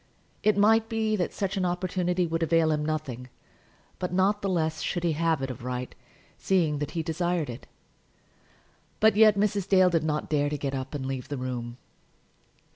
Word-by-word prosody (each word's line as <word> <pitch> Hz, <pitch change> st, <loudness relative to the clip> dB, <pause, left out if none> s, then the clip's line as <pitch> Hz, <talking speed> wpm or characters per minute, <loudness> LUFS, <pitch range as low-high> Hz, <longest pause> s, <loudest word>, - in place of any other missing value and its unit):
It 215 Hz, -1 st, +2 dB
might 225 Hz, +2 st, +4 dB
be 220 Hz, -1 st, 0 dB
that 180 Hz, -, -1 dB
such 195 Hz, 0 st, -2 dB
opportunity 180 Hz, 0 st, 0 dB
would 165 Hz, 0 st, -2 dB
avail 165 Hz, 0 st, +3 dB
him 150 Hz, -1 st, 0 dB
nothing, 140 Hz, -5 st, -4 dB, 0.7 s
but 180 Hz, -, -3 dB
not 195 Hz, +3 st, +2 dB
the 195 Hz, -, -1 dB
less 160 Hz, -3 st, -1 dB
should 175 Hz, -, -2 dB
he 170 Hz, -, +2 dB
have 160 Hz, -2 st, 0 dB
it 135 Hz, -, -2 dB
of 120 Hz, -, -9 dB
right, 125 Hz, 0 st, -4 dB, 0.5 s
seeing 165 Hz, -6 st, +1 dB
that 145 Hz, -, -3 dB
he 165 Hz, -, 0 dB
desired 165 Hz, -2 st, -1 dB
it. 120 Hz, -, -10 dB, 1.3 s
But 220 Hz, -1 st, +5 dB
yet 215 Hz, -1 st, +6 dB
Mrs. 200 Hz, -2 st, 0 dB
Dale 185 Hz, -2 st, +5 dB
did 165 Hz, -2 st, +1 dB
not 150 Hz, -1 st, -1 dB
dare 145 Hz, -1 st, +1 dB
to 150 Hz, -, -3 dB
get 140 Hz, -1 st, -3 dB
up 135 Hz, +1 st, -4 dB
and 135 Hz, -2 st, -4 dB
leave 130 Hz, -2 st, -4 dB
the 145 Hz, -, -3 dB
room. 125 Hz, -2 st, -5 dB
165 Hz, 185 wpm, -27 LUFS, 145-185 Hz, 1.3 s, yet